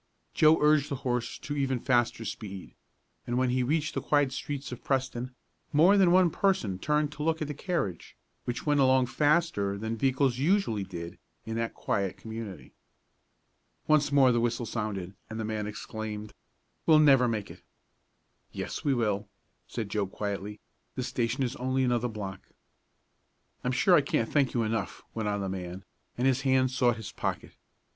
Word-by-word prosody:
Joe 155 +1 +6
urged 150 -1 +4
the 140 - -1
horse 125 -1 -1
to 145 - -5
even 135 -3 0
faster 120 -2 +1
speed, 100 -2 -7 0.5
and 120 - -1
when 130 -1 +2
he 130 +1 +1
reached 155 +4 0
the - - -2
quiet 145 -3 +2
streets 140 +1 -5
of 125 - -8
Preston 130 -2 -2 0.4
more 170 +7 +6
than 190 -3 +5
one 180 -1 +5
person 120 - 0
turned 150 +4 +1
to 150 0 -8
look 160 +1 +1
at 155 - -2
the 150 - -4
carriage, 145 - -3 0.3
which 120 - -4
went 145 -1 +3
along 130 -1 +5
faster 145 -9 +1
than 110 +2 -3
vehicles 130 +1 +1
usually 145 - +2
did 85 -2 -7 0.3
in 110 - -4
that 115 0 -2
quiet 100 -2 -1
community. 110 -4 -8 1.1
Once 150 -2 +3
more 135 -3 +6
the 120 - +2
whistle 120 0 0
sounded, 105 -5 -4 0.2
and 110 0 -5
the 110 - -2
man 105 -1 -2
exclaimed: 105 0 -6 0.5
"We'll 160 -2 +7
never 135 -5 +6
make 110 -3 -2
it!" - - -13 0.9
"Yes, - - -5
we 140 -2 +2
will," 105 -3 -1 0.4
said 110 -3 -4
Joe 100 -1 -1
quietly. 100 +1 -4 0.4
"The 130 - -2
station 120 +1 -1
is 125 +1 -2
only 130 +1 0
another 125 -1 +1
block." 100 -4 -7 1.1
"I'm 125 - 0
sure 135 +8 +3
I 165 - +7
can't 115 -5 -1
thank 140 -4 +2
you 115 - +2
enough," 110 -2 -3
went 110 -2 -2
on 100 0 -1
the 95 - -2
man, 95 0 -5 0.3
and 125 - 0
his 135 -1 +3
hand 130 -1 +3
sought 125 -2 +2
his 110 - -7
pocket. - - -4
125 Hz, 175 wpm, -29 LUFS, 110-145 Hz, 1.1 s, We'll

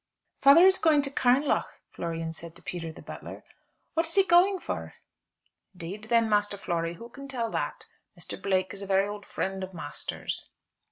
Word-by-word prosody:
"Father 285 +6 +8
is 380 0 +6
going 305 -3 +4
to 275 - 0
Carnlough," 265 +2 +2 0.2
Florian 165 -1 -4
said 165 0 -9
to - - -11
Peter, 165 -2 -5
the - - -13
butler. - - -9 0.5
"What 330 0 +2
is 330 - 0
he 390 - +6
going 380 +2 +5
for?" - - -5 0.8
"'Deed, 190 +6 -7
then, 230 0 +3
Master 205 -1 +1
Flory, 170 -3 -2
who 230 +7 -10
can 275 +3 -11
tell 235 -4 -3
that? - - -3 0.3
Mr. - - -6
Blake 185 -1 0
is 200 - -7
a 200 - -6
very 195 0 +3
old 205 0 -7
friend 190 0 -3
of 185 -1 -7
master's." 145 -3 -3
205 Hz, 180 wpm, -28 LUFS, 180-275 Hz, 0.8 s, Father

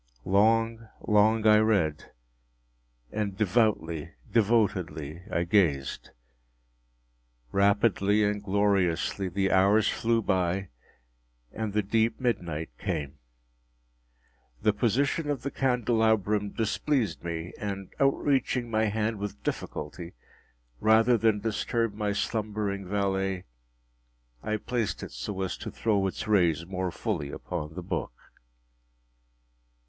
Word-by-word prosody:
Long, 115 +3 +2 0.2
long 110 +1 +4
I 105 0 +7
read—and - - -4
devoutly, 105 -7 +1 0.2
devotedly 90 -9 +1
I 85 - +1
gazed. 85 -8 +1 1.4
Rapidly 100 +1 +3
and 105 0 0
gloriously 100 -2 +1
the 95 +2 0
hours 100 +3 +4
flew 115 0 +1
by 95 0 0 0.8
and 110 -2 -3
the 105 0 +1
deep 110 +3 +1
midnight 85 - -2
came. 75 -7 -3 1.4
The 105 - +4
position 135 +8 +1
of 145 -3 -2
the 140 - -3
candelabrum 110 -5 +1
displeased 110 - -1
me, 85 0 -4
and 100 -2 -5
outreaching 135 -3 +1
my 110 0 +2
hand 110 0 -1
with 105 0 -6
difficulty, 85 +3 -5 0.7
rather 110 +2 +5
than 110 -2 +2
disturb 115 0 -1
my 105 0 -1
slumbering 105 -2 -2
valet, 95 -1 -1 1.0
I 110 0 -1
placed 115 0 -2
it - - -7
so 95 +12 -5
as 95 - -2
to - - -6
throw 100 -3 0
its 95 - -5
rays 85 -6 +3
more 95 0 -2
fully 70 -4 -3
upon 80 -1 -5
the 90 - -5
book. 85 - -3
100 Hz, 105 wpm, -28 LUFS, 90-110 Hz, 1.4 s, I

